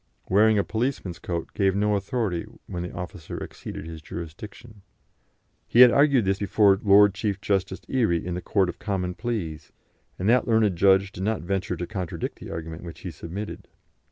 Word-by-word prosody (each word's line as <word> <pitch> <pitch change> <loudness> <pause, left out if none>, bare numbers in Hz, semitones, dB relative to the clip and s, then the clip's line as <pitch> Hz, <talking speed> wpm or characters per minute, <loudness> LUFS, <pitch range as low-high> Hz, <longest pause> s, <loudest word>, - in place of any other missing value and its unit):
Wearing 110 +3 +5
a 100 - +3
policeman's 110 -7 -2
coat 85 -2 -4
gave 95 -1 +2
no 105 +1 +2
authority 100 -3 -2 0.2
when 90 - -5
the 90 - -5
officer 90 -2 -7
exceeded - - -7
his 80 -1 -8
jurisdiction. 100 +7 -9 0.9
He 120 - +5
had 125 -1 +10
argued 140 -5 +4
this 95 0 +1
before 100 -1 +4
Lord 100 -1 +6
Chief 100 -1 -2
Justice 95 -1 -1
Erie 110 -12 +1
in 90 - -3
the 90 - -3
Court 95 -1 +1
of 90 - -6
Common 95 -3 -2
Pleas, 95 -8 -4 0.5
and 95 - -2
that 120 +2 +4
learned 110 -5 +3
judge 95 +2 +4
did 95 - -8
not 105 -4 -1
venture 95 0 -2
to 90 - -3
contradict 95 -3 -5
the - - -9
argument 80 0 -6
which 85 -2 -9
he 90 - -5
submitted. 85 +7 -7
95 Hz, 180 wpm, -25 LUFS, 90-105 Hz, 0.9 s, had